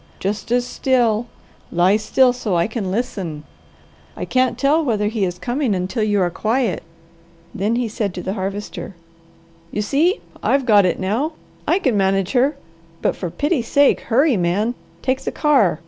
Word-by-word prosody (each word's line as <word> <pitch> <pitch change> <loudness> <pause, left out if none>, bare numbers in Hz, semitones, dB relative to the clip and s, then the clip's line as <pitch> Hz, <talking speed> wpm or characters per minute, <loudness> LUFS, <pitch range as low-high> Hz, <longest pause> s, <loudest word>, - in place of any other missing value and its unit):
Just 205 +4 -3
as 245 0 +2
still, 240 -3 +1 0.4
lie 180 +3 +4
still 245 +4 +3
so 225 -7 -2
I 170 0 +3
can 215 -4 -3
listen. 185 - -3 0.7
I - - -3
can't 255 -1 +1
tell 300 +4 +3
whether 210 -6 0
he 215 -3 0
is 180 -1 -4
coming 245 -2 -1
until 185 +6 -2
you 210 -1 +2
are 175 -1 +1
quiet." 220 +1 0 0.7
Then 210 +5 0
he 245 -1 0
said 210 -2 -2
to 180 - -5
the 190 - -2
Harvester, 200 0 -5 0.7
"You 210 - -2
see, 315 - +2 0.2
I've 275 -1 +2
got 205 -5 +5
it - - -1
now. 225 - -1 0.3
I - - +4
can 260 - +1
manage 195 -1 +1
her, 275 +3 +2 0.5
but - - +1
for 180 - -4
pity 295 - 0
sake, 280 +5 +3
hurry 265 +1 +2
man! 190 +7 +1 0.3
Take 260 0 0
the - - -3
car! 255 - +3
220 Hz, 170 wpm, -20 LUFS, 195-260 Hz, 0.7 s, got